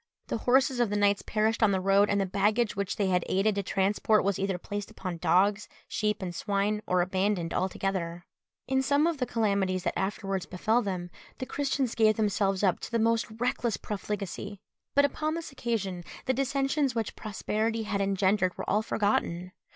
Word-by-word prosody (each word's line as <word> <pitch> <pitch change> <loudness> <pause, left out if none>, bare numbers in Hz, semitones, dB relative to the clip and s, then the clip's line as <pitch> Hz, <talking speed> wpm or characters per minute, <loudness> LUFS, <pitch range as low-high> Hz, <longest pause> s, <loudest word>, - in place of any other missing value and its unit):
The - - 0
horses 260 0 +4
of 240 -3 +2
the 205 - -1
knights 205 0 +3
perished 220 +2 0
on 220 - +5
the 190 - +1
road, 195 +2 +4
and 200 - +2
the 195 - +1
baggage 210 +4 +1
which 200 -1 -2
they 200 -2 0
had 180 -1 +2
aided 200 +3 +2
to 200 - -1
transport 200 +2 +2
was 200 -1 0
either 195 -1 0
placed 205 +3 -5
upon 185 -3 -5
dogs, 195 +5 +2 0.2
sheep, 210 -1 -1
and 175 -2 -4
swine, 205 +3 0
or 180 -1 +3
abandoned 185 -1 0
altogether. 180 -2 -2 0.4
In 265 0 +2
some 285 +3 +3
of 335 -4 0
the 250 - 0
calamities 200 -5 0
that - - 0
afterwards 195 -1 -2
befell 220 +6 +1
them, 180 -4 -4 0.3
the 260 - -4
Christians 270 -3 -1
gave 215 -1 +4
themselves 200 -2 +1
up 185 -3 +3
to - - -7
the 230 - +1
most 230 0 +2
reckless 240 -1 0
profligacy; 205 -1 -5 0.4
but 285 0 +6
upon 310 +2 -1
this 335 -2 -5
occasion, 210 -9 -3 0.2
the 260 - +2
dissensions 275 0 0
which 225 -2 -2
prosperity 220 +2 -2
had 200 -2 -1
engendered 195 -1 +1
were - - -5
all 210 +2 +2
forgotten. 185 -5 0
205 Hz, 185 wpm, -28 LUFS, 190-230 Hz, 0.4 s, but